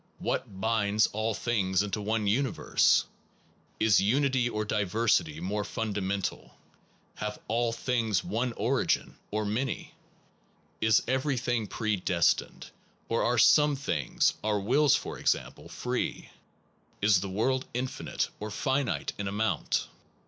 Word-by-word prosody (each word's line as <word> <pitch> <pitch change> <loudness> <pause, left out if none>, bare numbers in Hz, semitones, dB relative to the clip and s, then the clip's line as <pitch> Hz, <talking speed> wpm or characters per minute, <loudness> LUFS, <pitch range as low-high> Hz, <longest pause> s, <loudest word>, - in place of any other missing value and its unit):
What 95 - -3
binds 110 0 +2
all 110 +1 -1
things 100 -5 +1
into 105 +1 -3
one 110 +1 -1
universe? 120 +5 +2 0.7
Is 110 -4 +4
unity 130 +3 +2
or 110 -2 -2
diversity 105 -6 +1
more 100 +4 -2
fundamental? 100 -3 -3 0.6
Have 105 0 -4
all 115 +2 +1
things 115 -4 0
one 115 +7 -1
origin? 120 +6 0
or 105 +1 -2
many? 115 +5 -3 0.9
Is 110 -1 +4
everything 125 -4 0
predestined, 95 -6 0 0.4
or 115 - +1
are 120 +1 +1
some 150 +5 +5
things 135 - 0
(our 105 -1 +1
wills 135 +8 +4
for - - -4
example) - - -1
free? 125 0 -3 0.7
Is 100 -2 +4
the 100 - -4
world 130 +7 0
infinite 125 +2 -3
or 105 - -5
finite 130 +5 -1
in 100 - -2
amount? 105 +3 -1
110 Hz, 120 wpm, -29 LUFS, 100-125 Hz, 0.9 s, some